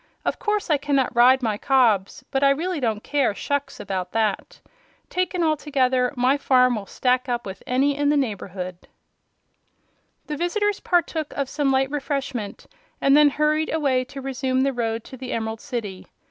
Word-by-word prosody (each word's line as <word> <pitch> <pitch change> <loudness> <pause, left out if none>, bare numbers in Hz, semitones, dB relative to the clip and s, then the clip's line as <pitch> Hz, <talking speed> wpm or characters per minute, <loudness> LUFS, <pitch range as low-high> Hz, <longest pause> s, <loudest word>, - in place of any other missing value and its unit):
Of - - -1
course 420 -5 -1
I 300 - +4
cannot 275 -3 0
ride 255 +2 +5
my 215 -3 -1
cobs, 230 -8 +2
but 270 +1 0
I 275 - +6
really 330 +4 0
don't 220 -5 -1
care 275 -8 +1
shucks 285 +4 -3
about 185 -2 -4
that. 215 -3 -1 0.5
Taken 365 -1 0
altogether, 270 -5 +1
my 255 +3 +2
farm 255 -3 +3
will 205 -3 -6
stack 255 +3 0
up 240 -1 -2
with 190 -1 -7
any 275 +3 +2
in 290 0 +1
the 295 - +3
neighborhood." 185 -7 -4 1.4
The 300 - -4
visitors 410 +5 0
partook 330 -4 0
of 280 -2 -2
some 290 -2 0
light 265 0 +1
refreshment 275 -7 -4 0.3
and 275 0 +4
then 295 0 +7
hurried 305 +2 0
away 275 -5 +1
to 275 +1 -9
resume 260 -1 -1
the 275 0 +1
road 225 -2 -2
to 260 - -11
the 255 0 -5
Emerald 220 0 -3
City. 205 -6 -5
265 Hz, 170 wpm, -23 LUFS, 235-290 Hz, 1.4 s, then